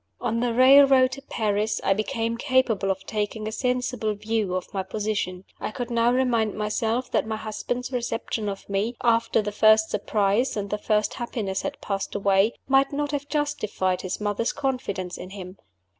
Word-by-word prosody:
On 230 -1 -1
the 240 0 +1
railroad 265 0 +7
to 275 +1 -7
Paris, 215 -5 -1
I 195 - +3
became 230 +2 -2
capable 235 -6 +1
of 190 0 -2
taking 215 0 -3
a - - -3
sensible 250 -3 -1
view 210 -3 -1
of 185 - -5
my 195 - -1
position. 195 -2 -3
I - - -3
could 240 +2 -5
now 235 0 +3
remind 240 -4 +1
myself 220 +3 -1
that - - +1
my 220 - -2
husband's 245 +4 -4
reception 230 -3 -2
of 195 - -7
me 200 +5 -1
after 230 -2 +3
the 210 - -3
first 215 +1 +4
surprise 210 +3 +1
and 200 -1 -3
the 210 - -1
first 210 0 +1
happiness 215 -5 -3
had 290 - -5
passed 195 -1 -3
away 200 +2 +3
might 270 0 +4
not 290 0 -2
have 285 -1 -3
justified 215 -11 -1
his 185 0 -4
mother's 210 +2 -1
confidence 250 -10 -3
in 185 - -8
him. 190 -1 -9
220 Hz, 175 wpm, -25 LUFS, 205-250 Hz, -, railroad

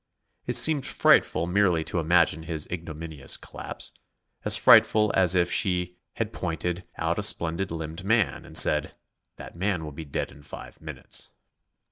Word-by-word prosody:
It 125 - -2
seemed 145 +3 +4
frightful 85 - +2
merely 90 -3 +1
to 80 +2 -3
imagine 80 -1 +2
his 80 -2 -4
ignominious 80 -4 -4
collapse; - - -8 0.5
as - - +4
frightful 105 -1 +5
as 95 -1 +4
if 85 -1 +1
she 90 -2 0 0.2
had - - -4
pointed 90 +2 -4
out 80 +2 -2
a - - -1
splendid 90 -2 +1
limbed 80 +1 -6
man 110 0 0
and - - -3
said: 75 -1 +4 0.4
"That - - -12
man 95 -2 -2
will 75 - -7
be 80 +3 -9
dead 70 - -4
in 70 - -16
five 75 - -12
minutes." - - -4
85 Hz, 155 wpm, -25 LUFS, 80-95 Hz, 0.5 s, frightful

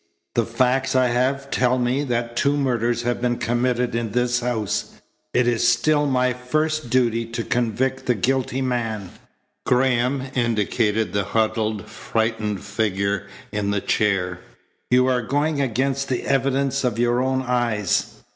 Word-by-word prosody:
The - - +1
facts 130 +1 +1
I 130 -1 +4
have 135 +3 0
tell 125 0 +2
me 125 +3 0
that 120 -2 -2
two 140 +3 +2
murders 120 -3 0
have 120 0 -1
been 120 -1 0
committed 120 +1 0
in 115 -3 -2
this 125 0 +1
house. 120 -4 -2 0.4
It 125 0 +2
is 120 0 +2
still 145 +5 +3
my 125 -2 +2
first 155 +3 -1
duty 115 -2 +2
to 115 0 -4
convict 125 +3 -1
the 125 - +3
guilty 130 +4 0
man." 115 -7 -2 0.5
Graham 125 +1 +2
indicated 110 -3 0
the 100 -1 0
huddled, 110 -1 -1
frightened 110 -3 -2
figure 100 -2 -1 0.2
in 105 -1 -1
the 100 0 +1
chair. 95 -3 0 0.5
"You 125 +1 +4
are 130 -1 +2
going 145 +4 0
against 135 +2 -1
the 125 - -1
evidence 135 0 +1
of 120 -3 0
your 120 +1 +2
own 130 0 0
eyes." 120 -6 0
120 Hz, 145 wpm, -22 LUFS, 115-130 Hz, 0.5 s, I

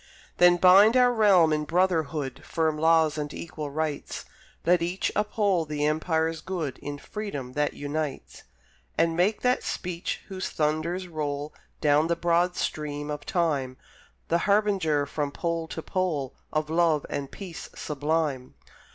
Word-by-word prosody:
Then 175 0 +6
bind 195 +7 +7
our 250 -1 +5
realm 190 -8 +5
in 150 0 0
brotherhood, 160 -6 0
Firm 160 -2 0
laws 160 -1 +3
and 145 -1 -3
equal 155 -3 -6
rights, 150 0 -3 0.4
Let 175 +1 +4
each 175 +3 -1
uphold 205 -6 +1
the 150 -1 -1
Empire's 160 +1 0
good 160 -9 -4
In 145 0 -6
freedom 145 -8 -6
that 145 +1 0
unites; 145 -1 -4 0.6
And 165 0 +2
make 190 +5 +1
that 250 0 +2
speech 175 -1 -4
whose 190 -2 -4
thunders 160 +4 -1
roll 150 -2 -4 0.3
Down 150 +1 +4
the 170 - +1
broad 175 +1 +1
stream 150 -1 -3
of 145 -1 -6
time 145 -8 0 0.5
The 170 - +2
harbinger 195 -8 +2
from 145 0 -3
pole 165 +1 -2
to 160 - -6
pole 160 -8 -1 0.2
Of 155 0 -1
love 165 -3 +2
and 140 -1 -4
peace 185 -5 -8
sublime. 150 -3 -2
160 Hz, 140 wpm, -27 LUFS, 150-180 Hz, 0.6 s, bind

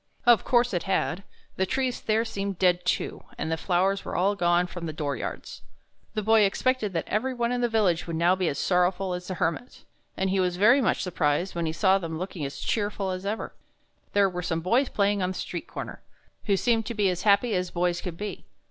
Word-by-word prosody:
Of 240 -3 +6
course 240 -2 +2
it 175 - 0
had: 190 -1 0 0.4
the 190 - +1
trees 260 +1 -1
there 220 +1 +1
seemed 200 -4 -4
dead, 180 -1 +2
too, - - -1
and 160 - -3
the - - +2
flowers 190 +3 +1
were - - -5
all 190 +3 +2
gone 175 -2 +2
from 175 -1 -6
the 155 - -4
door 145 -2 -2
yards. - - -6 0.5
The 215 - -1
Boy 220 +1 +5
expected 210 +1 +1
that 165 - -2
every 255 +5 -1
one 235 0 0
in 245 0 -1
the 240 - +2
village 200 -8 +1
would 165 - -3
now 170 +3 +3
be 185 -2 -1
as 140 - -1
sorrowful 180 +1 +1
as 180 0 -5
the 185 - -3
Hermit, 175 +7 -3 0.3
and 190 0 0
he 195 - +1
was 180 -1 0
very 235 +8 +5
much 235 - +1
surprised 175 0 0
when 170 -1 -2
he - - 0
saw 190 +3 +3
them 165 -3 -5
looking 180 -2 -5
as 140 - -6
cheerful 205 -3 -1
as 185 +1 -4
ever. 215 +2 -3 0.6
There 200 -1 +4
were 180 -1 -4
some 165 -1 -2
boys 235 - +2
playing 200 -1 +1
on 185 0 0
the - - -13
street - - -5
comer, - - -7 0.4
who 200 -2 +2
seemed 225 0 +1
to 235 - -4
be 205 -2 +2
as 180 - -4
happy 210 +3 +3
as 180 -1 0
boys 175 0 0
could 175 -2 -6
be. 210 +2 -6
190 Hz, 230 wpm, -26 LUFS, 175-215 Hz, 0.6 s, Of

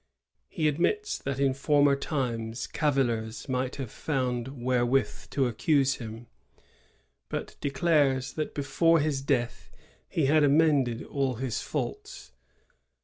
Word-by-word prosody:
He 155 - 0
admits 415 - 0
that 140 -1 -4
in 135 -1 +3
former 145 +1 +3
times 120 -5 -3
cavillers 120 -7 -1
might 130 -1 -1
have 135 -5 -6
found 125 -4 -2
wherewith 125 0 0
to 135 -1 +1
accuse 135 +2 +2
him, 115 0 -8 1.0
but - - -5
declares 140 -2 +1
that 155 - -4
before 165 +3 +3
his 145 -2 0
death 125 -4 -1 0.4
he 160 - +1
had 150 +2 +4
amended 140 -5 +3
all 135 -3 -1
his 125 -1 -3
faults. - - -5
135 Hz, 120 wpm, -28 LUFS, 125-145 Hz, 1.0 s, had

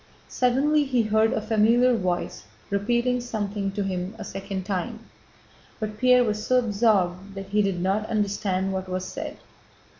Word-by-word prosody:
Suddenly 275 +5 +2
he 250 -4 +1
heard 220 +1 +2
a - - 0
familiar 225 +3 +3
voice 180 - -2 0.3
repeating 240 +5 +1
something 205 -4 -3
to 205 - -1
him 185 +1 -3
a - - -6
second 195 0 -5
time. 205 +4 -3 0.8
But 215 -1 -5
Pierre 250 -1 +5
was 215 -2 -2
so 255 +3 +2
absorbed 200 -5 +1
that 195 0 -7
he 210 +1 +2
did 195 -3 0
not 195 +4 0
understand 200 -3 0
what 190 0 -4
was 185 0 -3
said. - - -6
210 Hz, 155 wpm, -25 LUFS, 195-235 Hz, 0.8 s, Pierre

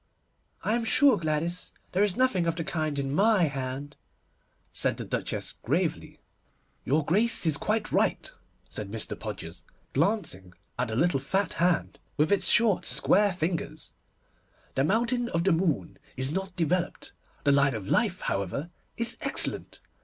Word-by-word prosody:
'I 215 - +2
am 235 - -2
sure, 275 +4 +5
Gladys, 165 +2 -2 0.2
there 185 - +1
is 205 0 +1
nothing 225 -10 +2
of 165 - 0
the 165 - -3
kind 155 -2 -2
in 135 0 -2
my 205 +2 +4
hand,' 140 -1 -3 0.8
said - - 0
the - - -5
Duchess - - -3
gravely. - - -1 0.7
'Your 145 +3 +1
Grace 210 +6 +3
is 160 -3 +3
quite 215 +6 -1
right,' - - +1 0.4
said - - -6
Mr. - - -3
Podgers, - - -7 0.3
glancing 155 - -1 0.3
at 125 - +1
the 110 - -4
little 165 +2 +2
fat 190 +9 -1
hand 175 0 0 0.2
with 155 +4 +2
its 195 -2 +3
short 230 -5 +4
square 205 +1 +4
fingers, 170 -1 -3 0.8
'the 135 - +1
mountain 235 +6 +1
of 165 0 0
the 190 - +3
moon 160 - 0 0.2
is 130 +2 0
not 190 +2 -4
developed. 175 +1 -1 0.3
The 145 - +4
line 140 -2 +3
of 100 -3 -6
life, 200 - +1
however, 100 - -3 0.3
is 235 0 0
excellent. - - -1
170 Hz, 155 wpm, -27 LUFS, 145-200 Hz, 0.8 s, sure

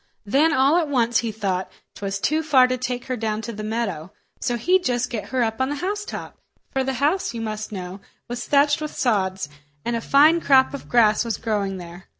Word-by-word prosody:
Then 280 +10 +3
all 280 +2 +4
at 335 -3 +1
once 240 -4 +2
he 230 -2 -2
thought 195 -3 -2 0.2
'twas 195 -1 -4
too 310 +9 +1
far 275 -5 +5
to 255 - 0
take 250 -1 -4
her 255 - -2
down 220 -1 -2
to 230 - -5
the 215 0 -6
meadow, 205 -7 -3 0.3
so 245 -2 -1
he'd 360 +10 +2
just 245 -3 -1
get 220 -4 -3
her 255 -2 +1
up 225 +2 -2
on 260 - +1
the 290 - -2
housetop—for 375 -6 -5
the 265 0 -1
house, 290 +3 0
you 230 - -4
must 215 -1 -4
know, 185 -1 -6 0.3
was 240 0 -5
thatched 290 +1 +3
with 305 - -5
sods, 190 - 0 0.4
and 235 - 0
a 230 - -2
fine 305 +7 +5
crop 265 -3 +4
of 280 - -8
grass 215 -3 +4
was 230 -2 -2
growing 205 -4 -2
there. 175 +1 -11
240 Hz, 210 wpm, -23 LUFS, 215-280 Hz, 0.4 s, far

